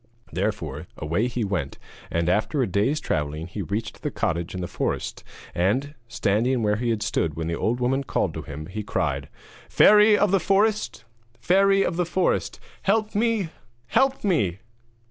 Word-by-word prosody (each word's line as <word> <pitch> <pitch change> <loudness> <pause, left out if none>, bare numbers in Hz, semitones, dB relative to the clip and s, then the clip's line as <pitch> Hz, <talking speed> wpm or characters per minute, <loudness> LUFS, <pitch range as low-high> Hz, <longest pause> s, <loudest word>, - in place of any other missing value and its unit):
Therefore - - -3
away 85 +10 0
he 120 -1 -2
went, 90 -9 -2 0.3
and 85 0 0
after 110 - +1
a - - +2
day's 105 - +1
travelling 75 +1 -2
he 90 +4 -6
reached 100 +6 -4
the - - -1
cottage 85 +2 -2
in 90 - -4
the 90 - -3
forest, - - -3 0.3
and, 125 +12 0
standing 115 +3 +1
where 105 0 +2
he 120 +1 -1
had 110 -2 0
stood 85 -7 -1
when 80 0 -3
the 85 - -2
old 120 +7 0
woman 130 +3 +1
called - - -1
to - - -5
him, 75 +2 -7
he 100 +5 -5
cried: - - -2 0.4
'Fairy 210 0 +6
of 205 -2 +2
the 195 - +4
forest! 205 - +1 0.4
Fairy 195 +1 +4
of 165 - -1
the 180 - +1
forest! 185 +1 0 0.2
Help 215 +2 +1
me! 220 -4 +1 0.4
help 270 0 +2
me!' 105 - +1
115 Hz, 170 wpm, -24 LUFS, -, 0.4 s, Fairy